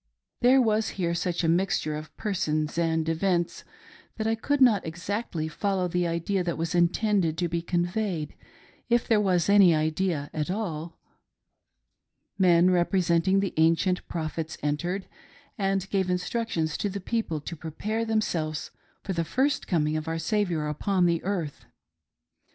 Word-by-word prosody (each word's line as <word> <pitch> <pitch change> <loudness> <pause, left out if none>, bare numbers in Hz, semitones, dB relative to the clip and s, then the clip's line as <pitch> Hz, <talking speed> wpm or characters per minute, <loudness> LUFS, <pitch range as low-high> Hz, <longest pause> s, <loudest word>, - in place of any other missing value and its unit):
There 255 +2 +6
was 220 -3 +2
here 170 -3 0
such 175 0 -1
a - - +2
mixture 165 -3 +1
of 155 0 -9
persons 155 -7 -1
and 160 -1 +1
events 170 +1 0 0.5
that 220 - -2
I 225 - +2
could 285 +6 0
not 235 -7 +5
exactly 170 0 -3
follow 185 +3 -1
the 175 0 0
idea 170 +3 -1
that 170 -2 -2
was 165 +2 -2
intended 175 -1 +2
to 175 - 0
be 170 0 -2
conveyed, 175 -1 -1 0.3
— - - -27
if 240 0 +2
there 220 -2 +4
was 180 -4 +2
any 200 -4 +6
idea 155 -1 -1
at 155 0 -2
all. 175 -5 -4 1.4
Men 180 -1 +5
representing 180 +1 +2
the 195 - -2
ancient 165 +3 +2
prophets 160 -1 -4
entered, 175 +6 -1 0.5
and 195 -3 0
gave 190 -2 +1
instructions 180 -3 -1
to 205 - -1
the 200 +1 -4
people 195 -5 -2
to 170 - -6
prepare 200 +8 -3
themselves 170 -9 -1 0.3
for 195 - -3
the 170 -1 0
first 270 - 0
coming 155 -4 +1
of 155 0 -3
our 165 0 -1
Saviour 170 -3 0
upon 180 +4 +1
earth. 175 -7 -3
175 Hz, 150 wpm, -27 LUFS, 160-200 Hz, 1.4 s, There